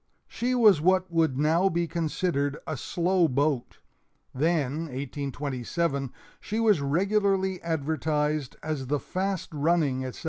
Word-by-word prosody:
She 250 +2 -1
was 215 -10 +6
what 185 +1 +2
would 160 -5 +2
now 160 +6 +3
be 170 -1 0
considered 155 -3 -1
a 155 - -3
slow 175 +6 +1
boat 140 -2 -1 0.6
then 155 +1 0
(1827) 140 +1 -3 0.3
she 215 +2 -3
was 215 -8 +3
regularly 190 +4 +1
advertised 155 -2 -1
as 150 -4 -3
the 145 +2 0
"fast 190 +2 -3
running," 150 -3 +1
etc. 130 -1 -6
155 Hz, 125 wpm, -27 LUFS, 140-185 Hz, 0.6 s, was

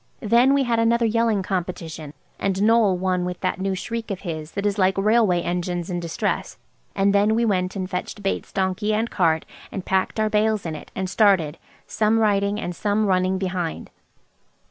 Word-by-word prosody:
Then 240 +5 +4
we 280 - +3
had 235 -2 +1
another 230 +1 +3
yelling 225 -3 +1
competition, 170 -5 -4 0.2
and 195 -1 0
Noël 210 -1 +3
won 180 0 0
with 180 0 -4
that 185 0 -1
new 195 0 0
shriek 230 +4 -5
of 195 -2 -4
his 160 -3 -6
that 200 0 -3
is 205 0 0
like 190 0 +3
railway 205 -3 +3
engines 175 0 -2
in 175 - -2
distress; 170 -1 -3 0.4
and 200 0 +2
then 205 +2 +3
we 235 +1 +2
went 185 -3 0
and 185 -2 -3
fetched 185 +2 -5
Bates' 195 - -2
donkey 195 +3 0
and 225 +2 -1
cart 160 -4 +1 0.3
and 190 - -5
packed 190 +3 0
our 215 - +2
bales 215 -1 +1
in 160 -2 -3
it - - -10
and 190 0 -2
started, 185 -7 +2 0.3
some 220 +1 +1
riding 205 -1 +1
and 175 -4 -4
some 210 +2 0
running 185 -1 +1
behind. 180 -3 -3
195 Hz, 190 wpm, -23 LUFS, 180-215 Hz, 0.4 s, Then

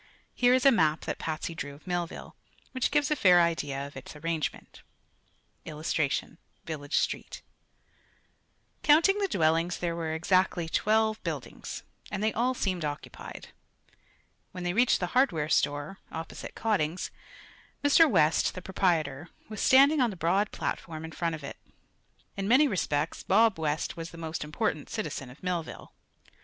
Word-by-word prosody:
Here 245 +1 +4
is 255 - +1
a 275 - +9
map 160 -9 +2
that - - -4
Patsy 160 +1 -3
drew 145 -3 -6
of 150 - -19
Millville, 175 -2 -4 0.4
which 260 -2 0
gives 295 0 +1
a - - +4
fair 180 -9 +6
idea 145 -5 0
of 140 - -11
its 130 +3 -9
arrangement: 160 +1 -4 0.8
[Illustration: 155 0 -2 0.3
Village 145 -3 -3
Street] - - -2 1.4
Counting 330 +7 +5
the 400 - +1
dwellings 165 - +1
there 170 -1 -2
were 160 -1 -2
exactly 180 0 +1
twelve 220 +5 +1
buildings, - - -6 0.3
and 205 0 -3
they 220 - +1
all 250 +3 +1
seemed 185 -7 -1
occupied. 145 -1 -7 1.0
When 180 - -6
they 175 0 -1
reached 240 +5 +3
the 180 - 0
hardware 170 - +2
store, 145 +5 0
opposite 160 0 -7
Cotting's, 185 -6 -1 0.7
Mr. 295 +3 +6
West, 160 - +3
the 185 - -6
proprietor, 165 -5 0 0.2
was 215 -2 -5
standing 280 +3 +6
on 245 - +3
the 200 - -6
broad 185 +5 +1
platform 160 -2 -4
in 160 - -8
front 165 0 -2
of 155 - -11
it. 140 - -7 0.8
In 195 0 -3
many 265 +7 +6
respects 165 - -1
Bob 215 -2 +3
West 150 -1 -1
was 165 0 -6
the 170 - -12
most 160 -2 -4
important 150 0 -2
citizen 180 - -4
of 130 +8 -15
Millville. 180 -3 -4
170 Hz, 150 wpm, -28 LUFS, 155-215 Hz, 1.4 s, a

